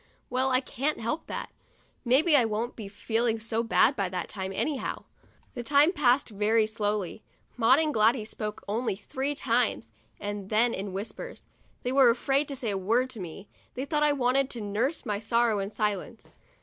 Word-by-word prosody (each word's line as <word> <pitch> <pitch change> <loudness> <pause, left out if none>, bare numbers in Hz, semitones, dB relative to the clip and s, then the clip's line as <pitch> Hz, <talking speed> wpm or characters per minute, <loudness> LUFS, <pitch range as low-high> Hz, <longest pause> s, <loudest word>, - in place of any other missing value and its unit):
Well, 260 +1 +1
I 255 0 +3
can't 275 +3 -2
help 265 +9 -3
that. - - -5 0.5
Maybe 280 +6 +4
I 265 - +6
won't 225 +2 -2
be 215 -4 -7
feeling 225 +3 -1
so 225 +1 -2
bad 235 +3 +3
by 195 -4 -1
that 180 0 -4
time, 190 -2 -4
anyhow." 270 +7 -2 0.5
The 245 - -5
time 290 +7 +4
passed 265 -5 +3
very 215 +1 +2
slowly. 210 -2 -2 0.3
Maud 245 +2 +5
and 310 -1 +1
Gladys 220 0 +2
spoke 210 -1 -5
only 225 +1 -1
three 265 +8 -3
times, 230 - 0 0.3
and 205 -1 -5
then 230 +2 +3
in 195 +1 -4
whispers. 210 - -7 0.4
They 250 - -1
were 265 -2 +6
afraid 270 +4 +1
to 280 - -5
say 240 -4 -2
a 195 - -2
word 235 +7 +1
to 230 - -8
me; 185 +2 -8 0.3
they 260 +2 -3
thought 300 +1 0
I 300 0 +4
wanted 265 0 +1
to 235 - -4
nurse 220 +9 -1
my 205 -1 -1
sorrow 230 0 +1
in 195 0 -3
silence. 210 +2 -3
230 Hz, 185 wpm, -28 LUFS, 210-260 Hz, 0.5 s, I